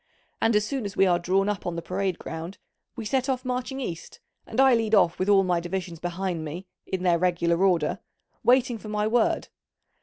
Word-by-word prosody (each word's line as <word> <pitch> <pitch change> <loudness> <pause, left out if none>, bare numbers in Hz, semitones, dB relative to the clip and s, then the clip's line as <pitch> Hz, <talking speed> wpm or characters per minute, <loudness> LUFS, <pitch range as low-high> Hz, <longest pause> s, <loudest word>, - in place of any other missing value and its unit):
And 225 -1 +3
as 210 0 +3
soon 270 +1 -3
as 200 - -6
we 195 - +5
are 175 -2 +3
drawn 190 +3 +1
up 205 -3 -2
on 175 - -2
the 170 - -3
parade 185 0 -2
ground 165 +4 -7 0.4
we 230 -3 -6
set 260 +5 0
off 255 -1 -1
marching 255 +1 -3
east, 170 -10 -6 0.3
and - - -4
I 270 -1 +6
lead 225 -2 +2
off 175 -4 +3
with 185 +2 0
all 195 -1 +6
my 180 -2 +1
divisions 175 -1 -5
behind 175 -1 -3
me, 165 +5 -6 0.2
in 185 -1 -3
their 175 -2 +3
regular 170 0 +1
order, 175 -6 +2 0.4
waiting 245 -2 +3
for 215 - -9
my 210 0 0
word. 225 +1 +1
195 Hz, 210 wpm, -26 LUFS, 175-225 Hz, 0.4 s, I